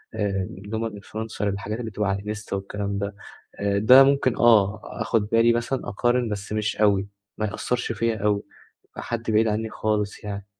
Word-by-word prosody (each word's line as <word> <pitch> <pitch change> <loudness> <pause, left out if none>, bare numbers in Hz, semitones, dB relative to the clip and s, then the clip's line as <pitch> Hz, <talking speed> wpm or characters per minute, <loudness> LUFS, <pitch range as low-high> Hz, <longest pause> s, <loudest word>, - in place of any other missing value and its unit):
آآ 100 -3 -1 0.2
اللي 110 +2 -3
هُم 115 0 -2
بيبقوا 105 -2 -10
influencer 110 0 -6
الحاجات 105 +2 -2
اللي 115 -2 -5
بتبقى 105 0 -1
على 100 0 0
الإنستا 105 -1 -5
والكلام 100 +1 -3
ده، 100 0 -3 0.4
آآ، 100 0 +1
ده 125 +6 +8
ممكن 135 -2 +2
آه 110 -3 +4
آخد 105 -2 -1
بالي 115 +1 +4
مثلًا 120 +3 -2
أقارن 120 +3 +1
بس 105 0 -4
مش 110 0 -1
أوي 100 -2 +3 0.3
ما 110 - -1
يأثّرش 120 +4 -2
فيَّ 115 +1 0
أوي 105 -1 0 0.5
حد 115 -1 -4
بعيد 110 +1 +3
عني 110 +1 -1
خالص 105 -2 -2
يعني، 100 -1 -5
105 Hz, 180 wpm, -24 LUFS, 100-115 Hz, 0.5 s, ده